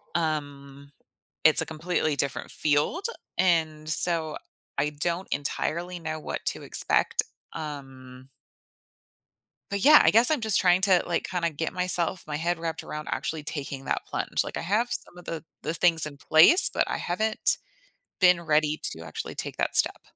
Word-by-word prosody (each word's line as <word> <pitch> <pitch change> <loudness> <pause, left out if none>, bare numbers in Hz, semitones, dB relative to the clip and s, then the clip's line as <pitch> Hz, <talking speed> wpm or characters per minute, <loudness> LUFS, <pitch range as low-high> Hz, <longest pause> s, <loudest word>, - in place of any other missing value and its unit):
um 140 -3 -4 0.5
it's 155 - +6
a - - -2
completely 160 -1 -2
different 140 -2 -3
field, 155 - 0 0.3
and 160 -4 +1
so 160 -1 +3 0.4
I 150 +1 0
don't 170 +5 -2
entirely 170 +5 -3
know 160 -1 -5
what - - -5
to - - -2
expect, - - +1 0.3
um 130 -3 -9 1.4
but, 200 -1 -2
yeah, 300 +1 +8
I - - +5
guess 230 +6 +6
I'm 305 - +1
just 220 -2 +2
trying 180 0 +3
to, 190 -3 +3
like, 175 - -1
kinda 170 -1 -1
get 160 +1 -4
myself 180 0 0
my 150 -1 -4
head 170 +2 -1
wrapped 165 -1 -5
around 150 0 -7
actually 160 -2 -3
taking 140 -2 -5
that - - -2
plunge, - - -2
like, - - -7
I - - -3
have 215 +7 0
some 175 - -4
of 180 - -13
the 160 -2 -6 0.2
the 155 - -3
things 165 -1 +2
in 145 -2 -8
place, 160 - +6
but - - 0
I - - -2
haven't 215 +5 0 0.6
been 180 -2 +5
ready 155 -1 +1
to 80 - -9
actually 80 - -7
take - - -6
that - - -1
step. - - +2
160 Hz, 165 wpm, -26 LUFS, 150-180 Hz, 1.4 s, yeah